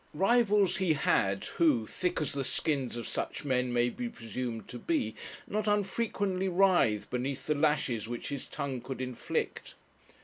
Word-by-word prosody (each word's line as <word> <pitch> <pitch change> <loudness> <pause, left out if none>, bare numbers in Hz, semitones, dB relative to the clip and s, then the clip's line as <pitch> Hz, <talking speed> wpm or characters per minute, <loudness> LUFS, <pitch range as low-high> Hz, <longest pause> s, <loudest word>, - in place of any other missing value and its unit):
Rivals 205 0 +4
he 185 -4 +3
had, 95 -8 +1
who, 145 -10 +2
thick 180 +9 -1
as 150 - -1
the 140 -1 -1
skins 135 -3 -1
of 120 - -5
such - - -3
men 125 -2 +1
may 120 0 +2
be 245 -1 -4
presumed 115 - -5
to 120 - -7
be, 115 -7 0 0.3
not 215 +1 -1
unfrequently 200 -2 0
writhed 175 - +3
beneath 130 +2 -2
the 155 - +2
lashes 145 -7 +1
which 120 0 -4
his 140 -2 -4
tongue 140 -4 -4
could 135 +1 -6
inflict. 130 -1 -3
140 Hz, 160 wpm, -31 LUFS, 120-190 Hz, 0.3 s, Rivals